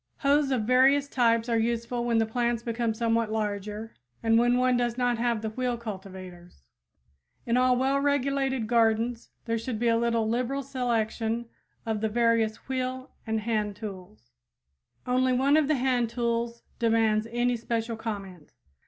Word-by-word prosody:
Hoes 285 Hz, 0 st, +3 dB
of 255 Hz, -5 st, 0 dB
various 265 Hz, +4 st, +4 dB
types 230 Hz, -3 st, +2 dB
are 230 Hz, -1 st, +1 dB
useful 235 Hz, +1 st, -1 dB
when 235 Hz, -1 st, +1 dB
the 225 Hz, -, +3 dB
plants 235 Hz, +1 st, -1 dB
become 230 Hz, -1 st, -1 dB
somewhat 230 Hz, -1 st, 0 dB
larger 210 Hz, 0 st, -3 dB, 0.3 s
or 225 Hz, -, +1 dB
when 240 Hz, +2 st, +4 dB
one 255 Hz, 0 st, +3 dB
does 240 Hz, -1 st, 0 dB
not 245 Hz, -2 st, +1 dB
have 235 Hz, -2 st, 0 dB
the 220 Hz, -, -2 dB
wheel 250 Hz, +1 st, -2 dB
cultivators. 185 Hz, -, -9 dB, 0.8 s
In 235 Hz, -, +1 dB
all 255 Hz, 0 st, +4 dB
well 270 Hz, +2 st, +2 dB
regulated 275 Hz, -3 st, 0 dB
gardens 230 Hz, +1 st, +1 dB, 0.2 s
there 230 Hz, 0 st, -1 dB
should 230 Hz, 0 st, -4 dB
be 235 Hz, +1 st, +1 dB
a 230 Hz, -, +3 dB
little 230 Hz, -1 st, +1 dB
liberal 250 Hz, +4 st, -1 dB
selection 235 Hz, -3 st, -1 dB, 0.4 s
of 220 Hz, -2 st, -2 dB
the 220 Hz, -, 0 dB
various 230 Hz, -1 st, +1 dB
wheel 255 Hz, 0 st, -3 dB, 0.2 s
and 220 Hz, 0 st, 0 dB
hand 210 Hz, -2 st, -1 dB
tools. 195 Hz, -, -9 dB, 0.7 s
Only 255 Hz, +1 st, +2 dB
one 270 Hz, +3 st, +3 dB
of 310 Hz, -2 st, +3 dB
the 310 Hz, -, +2 dB
hand 250 Hz, -3 st, +1 dB
tools 235 Hz, 0 st, -2 dB, 0.2 s
demands 225 Hz, -1 st, +2 dB
any 240 Hz, +1 st, +1 dB
special 230 Hz, 0 st, -2 dB
comment. 195 Hz, -7 st, -7 dB
235 Hz, 160 wpm, -27 LUFS, 220-250 Hz, 0.8 s, various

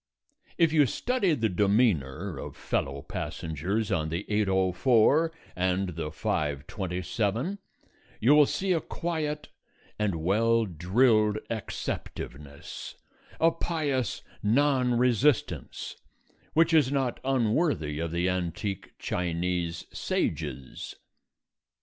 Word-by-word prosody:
If 165 Hz, -2 st, +4 dB
you 150 Hz, -4 st, +5 dB
study 205 Hz, -, +1 dB
the 115 Hz, -5 st, +1 dB
demeanour 100 Hz, -, +1 dB
of -, -, -7 dB
fellow 70 Hz, 0 st, -2 dB
passengers 90 Hz, +8 st, -3 dB
on 80 Hz, -2 st, 0 dB
the 85 Hz, +5 st, -2 dB
8:04 105 Hz, -, +3 dB, 0.3 s
and 95 Hz, +1 st, 0 dB
the 80 Hz, -2 st, -4 dB
5:27 95 Hz, -, -2 dB, 0.6 s
you 130 Hz, +6 st, +5 dB
will 150 Hz, -1 st, +7 dB
see 190 Hz, -1 st, 0 dB
a 165 Hz, -, +1 dB
quiet 155 Hz, -3 st, -3 dB, 0.5 s
and 105 Hz, -4 st, +1 dB
well 110 Hz, +7 st, +2 dB
drilled 105 Hz, +5 st, +3 dB
acceptiveness, 75 Hz, -9 st, -6 dB, 0.4 s
a 165 Hz, +1 st, +5 dB
pious 145 Hz, -, -1 dB, 0.2 s
non 125 Hz, +2 st, +3 dB
resistance, 125 Hz, +2 st, +1 dB, 0.6 s
which 165 Hz, +2 st, +4 dB
is 145 Hz, -5 st, +5 dB
not 135 Hz, -3 st, 0 dB
unworthy 120 Hz, -, +1 dB
of 85 Hz, 0 st, -1 dB
the 85 Hz, +2 st, 0 dB
antique 90 Hz, +2 st, -3 dB
Chinese 85 Hz, -1 st, -2 dB
sages. 65 Hz, -1 st, -3 dB
105 Hz, 100 wpm, -28 LUFS, 90-135 Hz, 0.6 s, will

